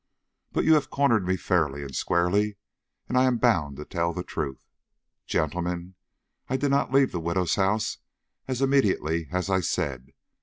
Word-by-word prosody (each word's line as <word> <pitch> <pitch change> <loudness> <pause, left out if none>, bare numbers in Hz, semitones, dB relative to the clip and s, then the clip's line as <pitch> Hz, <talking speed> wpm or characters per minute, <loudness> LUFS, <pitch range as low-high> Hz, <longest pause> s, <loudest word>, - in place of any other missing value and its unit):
But - - 0
you 160 - +6
have 150 -2 +2
cornered 120 -9 +2
me 95 0 +1
fairly 75 -7 0
and 70 -1 -8
squarely, 100 +4 +1 0.5
and - - -3
I 130 +1 +5
am 125 -2 +2
bound 85 - +1
to 75 - -7
tell 85 -2 -1
the 90 - -4
truth. 65 -6 -5 0.6
Gentlemen, 85 +3 -2 0.6
I 130 - +1
did 140 +1 0
not 140 -1 +1
leave 135 0 +4
the 85 - -3
widow's 85 +1 0
house 100 +2 0 0.5
as 130 0 -1
immediately 95 - +2
as 90 0 -1
I 95 -1 +2
said. 70 -7 -2
90 Hz, 165 wpm, -26 LUFS, 85-125 Hz, 0.6 s, you